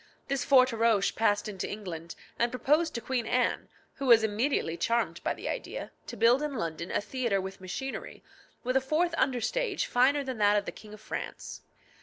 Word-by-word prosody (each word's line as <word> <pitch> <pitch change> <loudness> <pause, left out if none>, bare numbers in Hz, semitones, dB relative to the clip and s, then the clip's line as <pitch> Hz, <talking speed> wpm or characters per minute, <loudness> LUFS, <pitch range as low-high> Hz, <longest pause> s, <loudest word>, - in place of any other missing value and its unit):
This 275 -2 0
Forteroche 230 -6 +4
passed 215 -1 +2
into 195 -4 -4
England, 170 -5 -6 0.2
and 235 - +3
proposed 305 +6 +1
to 235 - -2
Queen 240 -1 -2
Anne, 250 0 0 0.3
who 275 - -3
was 230 -2 +7
immediately 220 - 0
charmed 235 +6 0
by - - 0
the - - -7
idea, - - -4 0.2
to - - -7
build 235 +5 +5
in 300 -2 -2
London 170 -4 -3
a - - 0
theatre 225 -1 -1
with 190 0 -6
machinery, 265 +9 -6 0.4
with 255 +1 -1
a 265 - +4
fourth 315 +6 +1
under 265 -5 +1
stage 435 - -1
finer 270 +3 +3
than 260 -4 -5
that 205 0 +4
of 205 - 0
the - - -4
King 215 -1 -12
of 215 - -17
France. - - -6
235 Hz, 190 wpm, -29 LUFS, 205-265 Hz, 0.4 s, was